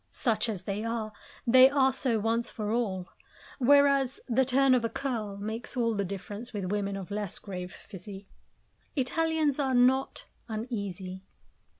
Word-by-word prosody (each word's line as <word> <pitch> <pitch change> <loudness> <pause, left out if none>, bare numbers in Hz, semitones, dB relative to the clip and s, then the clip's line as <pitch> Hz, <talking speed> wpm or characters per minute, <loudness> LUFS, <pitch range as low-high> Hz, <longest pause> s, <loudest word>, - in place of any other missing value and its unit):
Such 225 -1 0
as 195 -5 -4
they 200 +2 -3
are, 225 -2 -3 0.3
they 255 +2 +8
are 265 -1 +3
so 255 -3 +1
once 225 +2 0
for 210 -1 -4
all; 195 -6 -1 0.5
whereas, 275 0 +4
the 260 +1 +3
turn 265 +1 +4
of 250 -2 +3
a 230 - 0
curl 225 -8 -3
makes 220 +5 -5
all 230 -2 +2
the 200 - 0
difference 200 +5 -6
with 195 -3 -3
women 200 -1 -1
of 195 0 -8
less 205 -2 -2
grave 180 -2 -6
physique. 195 0 -10 0.7
Italians 310 +1 +1
are 265 -2 +1
not 255 +2 +2 0.2
uneasy. 200 -5 -5
230 Hz, 155 wpm, -29 LUFS, 200-260 Hz, 0.7 s, they